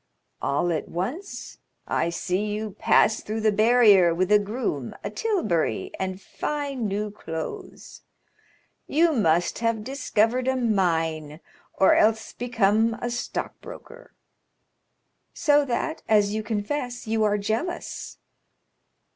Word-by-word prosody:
"All 160 Hz, +5 st, 0 dB
at 160 Hz, -, -3 dB
once 255 Hz, -, -5 dB, 0.3 s
I 165 Hz, -, 0 dB
see 185 Hz, +4 st, -2 dB
you 210 Hz, 0 st, -3 dB
pass 210 Hz, +2 st, +3 dB
through 220 Hz, +1 st, -4 dB
the 215 Hz, 0 st, +3 dB
barrier 210 Hz, -5 st, +5 dB
with 185 Hz, +3 st, 0 dB
a 210 Hz, -, +7 dB
groom, 205 Hz, -, -3 dB
a 205 Hz, -, -4 dB
tilbury, 210 Hz, -, -1 dB
and 190 Hz, 0 st, -3 dB
fine 275 Hz, +2 st, -3 dB
new 205 Hz, +1 st, -2 dB
clothes. 160 Hz, -5 st, -7 dB, 0.9 s
You 325 Hz, +2 st, +3 dB
must 175 Hz, -, +1 dB
have 230 Hz, -2 st, 0 dB
discovered 255 Hz, -1 st, 0 dB
a 260 Hz, -, +2 dB
mine, 165 Hz, -, 0 dB, 0.4 s
or 190 Hz, -, +5 dB
else 220 Hz, +1 st, +2 dB
become 225 Hz, -2 st, +1 dB
a 240 Hz, -, -3 dB
stockbroker." 365 Hz, -, -7 dB, 1.2 s
"So 290 Hz, -1 st, +3 dB
that, 315 Hz, +5 st, -2 dB
as 210 Hz, -2 st, +4 dB
you 220 Hz, -, -1 dB
confess, 240 Hz, +4 st, -3 dB
you 220 Hz, 0 st, 0 dB
are 210 Hz, -1 st, +2 dB
jealous?" 220 Hz, -, -4 dB
215 Hz, 120 wpm, -25 LUFS, 190-245 Hz, 1.2 s, a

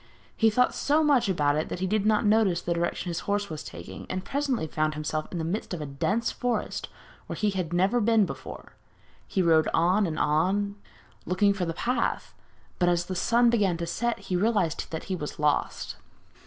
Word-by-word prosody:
He 225 Hz, -, +4 dB
thought 250 Hz, +4 st, +2 dB
so 300 Hz, +2 st, +2 dB
much 265 Hz, -8 st, +3 dB
about 145 Hz, -5 st, +2 dB
it 155 Hz, -, -2 dB
that -, -, -4 dB
he 190 Hz, -, 0 dB
did 210 Hz, +2 st, +1 dB
not 215 Hz, +1 st, +3 dB
notice 210 Hz, -5 st, +3 dB
the 175 Hz, -, -1 dB
direction 170 Hz, +1 st, -2 dB
his 170 Hz, -, -2 dB
horse 205 Hz, -2 st, 0 dB
was 155 Hz, -, -5 dB
taking, 85 Hz, +2 st, -9 dB
and 185 Hz, 0 st, -3 dB
presently 275 Hz, -, -1 dB
he 155 Hz, -, -10 dB
found 155 Hz, 0 st, 0 dB
himself 155 Hz, 0 st, -3 dB
in 180 Hz, -, -4 dB
the 165 Hz, -, -2 dB
midst 180 Hz, +3 st, -3 dB
of -, -, -7 dB
a 150 Hz, -, -4 dB
dense 195 Hz, +12 st, -1 dB
forest 245 Hz, -1 st, -2 dB, 0.4 s
where -, -, -4 dB
he 210 Hz, -1 st, +1 dB
had 185 Hz, -4 st, -3 dB
never 190 Hz, +7 st, +2 dB
been 220 Hz, -1 st, +4 dB
before. -, -, -8 dB, 0.5 s
He 190 Hz, -, 0 dB
rode 160 Hz, -2 st, +4 dB
on 180 Hz, +5 st, +3 dB
and 155 Hz, -, -4 dB
on, 190 Hz, +7 st, +1 dB, 0.5 s
looking 200 Hz, +3 st, +3 dB
for 190 Hz, -2 st, -2 dB
the 165 Hz, -1 st, -3 dB
path, 245 Hz, -1 st, -1 dB, 0.5 s
but 175 Hz, -, +3 dB
as 175 Hz, 0 st, +1 dB
the 185 Hz, -, -4 dB
sun 235 Hz, +6 st, +3 dB
began 200 Hz, -7 st, +2 dB
to 170 Hz, -, -3 dB
set 235 Hz, +8 st, -1 dB
he 195 Hz, -2 st, -4 dB
realised 190 Hz, -4 st, +1 dB
that 160 Hz, -, -5 dB
he 190 Hz, -, -3 dB
was 150 Hz, -4 st, -6 dB
lost. 150 Hz, -1 st, 0 dB
185 Hz, 210 wpm, -27 LUFS, 165-215 Hz, 0.5 s, He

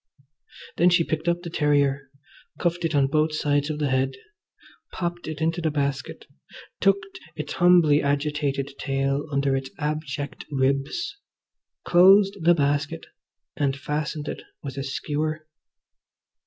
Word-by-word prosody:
Then 175 Hz, +2 st, +5 dB
she 175 Hz, -1 st, +4 dB
picked 160 Hz, +1 st, -3 dB
up 175 Hz, 0 st, +1 dB
the 170 Hz, -, -6 dB
terrier, 140 Hz, -3 st, +1 dB, 0.5 s
cuffed 175 Hz, 0 st, -1 dB
it 160 Hz, -2 st, -1 dB
on 140 Hz, -1 st, +4 dB
both 155 Hz, +2 st, +1 dB
sides 145 Hz, 0 st, +1 dB
of 155 Hz, -, -2 dB
the 150 Hz, -2 st, 0 dB
head, 130 Hz, 0 st, +1 dB, 0.8 s
popped 175 Hz, -1 st, -4 dB
it 155 Hz, -1 st, -5 dB
into 165 Hz, +2 st, 0 dB
the 160 Hz, -, +1 dB
basket, 140 Hz, -3 st, -3 dB, 0.5 s
tucked 195 Hz, 0 st, +1 dB, 0.2 s
its -, -, -5 dB
humbly 175 Hz, -4 st, +5 dB
agitated 140 Hz, -1 st, -1 dB
tail 135 Hz, +2 st, -1 dB
under 140 Hz, -1 st, +1 dB
its 135 Hz, 0 st, -3 dB
abject 150 Hz, -2 st, -4 dB
ribs, 140 Hz, -, -1 dB, 0.7 s
closed 195 Hz, +3 st, +6 dB
the 175 Hz, +1 st, +6 dB
basket, 145 Hz, 0 st, -1 dB, 0.5 s
and 140 Hz, -2 st, 0 dB
fastened 150 Hz, +1 st, -3 dB
it -, -, -5 dB, 0.2 s
with 135 Hz, -2 st, -6 dB
a 135 Hz, -, -3 dB
skewer. 155 Hz, +3 st, -3 dB
150 Hz, 135 wpm, -25 LUFS, 140-165 Hz, 0.8 s, closed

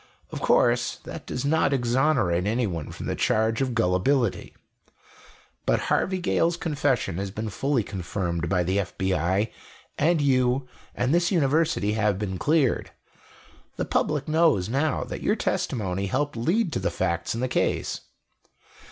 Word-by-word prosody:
"Of -, -, -5 dB
course, -, -, +3 dB
that -, -, -8 dB
does 125 Hz, -, -3 dB
not 145 Hz, -1 st, +2 dB
exonerate 120 Hz, -, +1 dB
anyone 105 Hz, -9 st, -1 dB
from -, -, -7 dB
the -, -, -1 dB
charge 110 Hz, +3 st, +1 dB
of 130 Hz, -3 st, -1 dB
gullibility. 115 Hz, +4 st, +1 dB, 1.1 s
But -, -, +3 dB
Harvey 190 Hz, 0 st, +1 dB
Gale's 170 Hz, -1 st, +1 dB
confession 145 Hz, -, -1 dB
has 100 Hz, 0 st, -3 dB
been 110 Hz, +2 st, -5 dB
fully 135 Hz, +1 st, 0 dB
confirmed 85 Hz, -3 st, -3 dB
by 90 Hz, -1 st, +2 dB
the 95 Hz, +3 st, 0 dB
FBI, 95 Hz, +1 st, 0 dB, 0.5 s
and 165 Hz, +2 st, +3 dB
you 130 Hz, -2 st, +2 dB, 0.3 s
and 125 Hz, +4 st, 0 dB
this 175 Hz, 0 st, +3 dB
University 155 Hz, -, +2 dB
have 105 Hz, -3 st, +1 dB
been 95 Hz, -3 st, -4 dB
cleared. 150 Hz, -4 st, +1 dB, 0.9 s
The -, -, -2 dB
public 150 Hz, -2 st, 0 dB
knows 155 Hz, -, +3 dB
now 140 Hz, +4 st, 0 dB
that -, -, -6 dB
your -, -, +2 dB
testimony 100 Hz, -4 st, -1 dB
helped 145 Hz, +6 st, -1 dB
lead 170 Hz, -, 0 dB
to -, -, 0 dB
the 95 Hz, -, 0 dB
facts 90 Hz, +2 st, -2 dB
in 115 Hz, -, -3 dB
the 130 Hz, -, +1 dB
case. 125 Hz, -, -1 dB
120 Hz, 145 wpm, -25 LUFS, 95-145 Hz, 1.1 s, course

